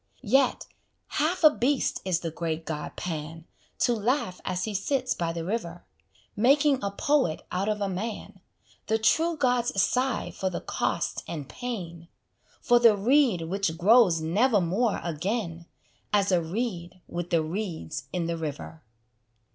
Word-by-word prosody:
Yet, 260 +4 +2 0.4
half 320 +4 0
a 310 - +9
beast 260 +3 0
is 180 -2 0
the 165 - -3
great 165 0 -3
god 150 -2 -5
Pan, 160 -1 -5 0.4
To 240 - +3
laugh 220 -4 -1
as 185 -1 -2
he 215 - -3
sits 255 +6 0
by 170 -1 -2
the 165 -1 -5
river, 175 -4 -4 0.5
Making 275 +5 +4
a 200 - 0
poet 265 - 0
out 190 +3 -1
of 210 -1 -1
a 200 - +1
man: 200 +4 -5 0.5
The 220 - +2
true 325 +9 +2
gods 245 -6 +1
sigh 250 +5 +1
for 190 - -2
the 180 - -4
cost - - -2
and 150 -5 -5
pain, 175 -9 -6 0.5
For 240 -1 +4
the 230 -3 +6
reed 240 - +3
which 170 -1 -2
grows 190 -3 +5
nevermore 205 +3 +2
again 170 0 -3 0.4
As 200 -1 +2
a 180 -2 +3
reed 185 -1 -4
with 175 0 -5
the 165 -2 +2
reeds 160 - -4
in 175 -2 -1
the 170 0 -2
river. 160 +1 -6
195 Hz, 150 wpm, -27 LUFS, 170-240 Hz, 0.5 s, a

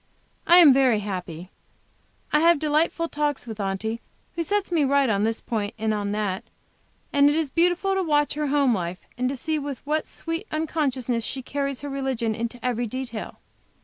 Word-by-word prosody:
I 345 - +8
am 320 -6 +9
very 255 -5 +3
happy. 180 -3 -6 0.8
I 300 - +5
have 335 +1 +5
delightful 310 +3 +1
talks 295 -4 -2
with 220 -2 -7
Aunty, 205 +4 -2 0.3
who 340 - -2
sets 405 +2 0
me 325 -4 +3
right 280 0 +3
at 205 -2 +1
this 225 +1 0
point 210 -3 -3
and 220 0 0
at 205 -1 -2
that; 205 -3 -2 0.7
and 285 0 +6
it 295 - +1
is 315 -4 -1
beautiful 355 +4 +2
to 385 - +1
watch 295 -4 +2
her 300 0 -2
home 280 -3 +3
life 180 -2 -3
and 250 0 0
to 275 - -3
see 310 +4 -1
with 280 -2 -4
what 305 +1 -1
sweet 330 +6 -4
unconsciousness 270 -7 -1
she 260 +3 -4
carries 275 0 -3
her 285 - -5
religion 265 -5 -1
into 235 +2 -4
every 240 -1 0
detail. 245 -1 -6
270 Hz, 185 wpm, -24 LUFS, 225-305 Hz, 0.8 s, am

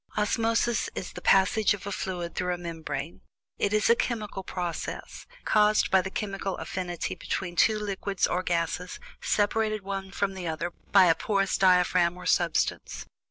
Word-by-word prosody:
Osmosis 225 +2 +1
is 185 - -5
"the - - -8
passage 195 +2 +4
of 195 - -12
a 200 - -4
fluid 180 -3 -4
through 180 -1 -1
a - - -9
membrane"; 160 -3 -5 0.4
it 200 - +1
is 215 0 +2
a 235 - +6
chemical 220 -5 -3
process, 180 -2 -5 0.2
caused 210 0 +3
by 190 - +5
the 190 - -5
chemical 195 -1 -3
affinity 175 -2 -4
between 175 -2 -4
two 215 +4 +4
liquids 200 -2 -1
or 180 - 0
gases 175 0 -2 0.2
separated 215 0 +1
one 195 0 -4
from 195 0 -1
the 185 -2 -5
other 165 +2 -3 0.2
by 195 -2 +7
a 165 - +6
porous 195 +2 0
diaphragm 180 -2 +3
or 180 - -10
substance. 175 -2 0
190 Hz, 160 wpm, -27 LUFS, 175-205 Hz, 0.4 s, by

